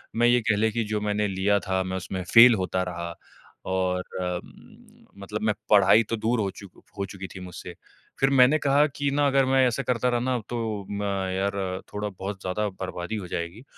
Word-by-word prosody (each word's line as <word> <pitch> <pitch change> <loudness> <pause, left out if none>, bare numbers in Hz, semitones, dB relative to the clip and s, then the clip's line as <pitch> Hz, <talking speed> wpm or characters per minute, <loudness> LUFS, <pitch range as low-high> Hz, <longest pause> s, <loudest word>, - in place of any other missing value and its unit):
मैं 120 +1 +4
ये 120 0 +4
कह 110 - +4
लें 110 +1 +2
कि 115 +2 -1
जो 105 - 0
मैंने 105 0 0
लिया 100 +1 +1
था, 95 0 +1
मैं 95 0 -3
उसमें 95 0 -5
फ़ेल 115 0 +9
होता 95 -1 -1
रहा 85 -1 -5 0.6
और 90 -1 0 0.2
उम, 90 -1 -8 0.2
मतलब 105 +2 -5
मैं 110 -1 +2 0.2
पढ़ाई 105 +2 +6
तो 115 - 0
दूर 115 +2 0
हो 100 -2 0
चुक 100 -2 -14 0.2
हो 100 - -2
चुकी 95 0 -8
थी - - -7
मुझसे। 90 -1 -9 0.4
फिर 135 - +3
मैंने 135 +2 +5
कहा 145 +1 +3
कि 140 0 -2
ना, 145 +1 +2
अगर 135 -1 +3
मैं 130 0 +3
ऐसा 125 +3 -1
करता 125 0 0
रहा 120 -1 +1
ना, 125 +1 0
तो 110 -4 -3
म 100 0 -3 0.3
यार, 95 -1 -2
थोड़ा-बहुत 100 -1 -5
ज़्यादा 100 +3 -2
बर्बादी 95 +1 -5
हो 100 -4 -5
जाएगी, 85 +7 -5
105 Hz, 200 wpm, -25 LUFS, 95-120 Hz, 0.6 s, फ़ेल